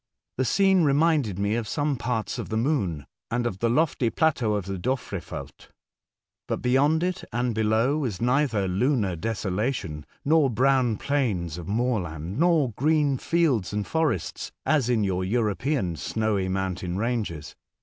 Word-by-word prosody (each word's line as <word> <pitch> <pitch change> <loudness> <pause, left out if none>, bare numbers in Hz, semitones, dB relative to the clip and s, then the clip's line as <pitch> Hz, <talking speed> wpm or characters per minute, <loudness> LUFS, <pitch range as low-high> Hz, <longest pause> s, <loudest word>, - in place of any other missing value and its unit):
The 130 - +2
scene 190 +3 +4
reminded 145 - +2
me 100 +1 0
of 115 -1 -1
some 145 +6 0
parts 120 -3 -2
of - - -5
the 110 - -1
Moon, 105 - 0 0.2
and 120 +1 -1
of 95 -5 -3
the 115 - +1
lofty 135 -2 +2
plateau 125 -8 +1
of 100 -3 -2
the 95 -1 -4
Dofrefeld. 115 -5 -5 0.8
But - - -3
beyond 145 +6 +3
it 185 +1 -2
and 120 0 0
below, 110 +6 +2
was 120 -11 -3
neither 125 -5 +1
lunar 100 0 +1
desolation 95 - -3 0.2
nor 155 -1 +4
brown 125 -1 +2
plains 95 - -1
of 85 - -8
moorland, 100 - -2
nor 165 -7 +3
green 145 +2 +1
fields 145 - +1
and 105 -1 -1
forests 155 - -1
as 140 -4 +2
in 115 -4 +2
your 95 -2 0
European 105 - 0
snowy 105 - -1
mountain 95 -1 -2
ranges. 105 - -3
115 Hz, 150 wpm, -26 LUFS, 95-140 Hz, 0.8 s, scene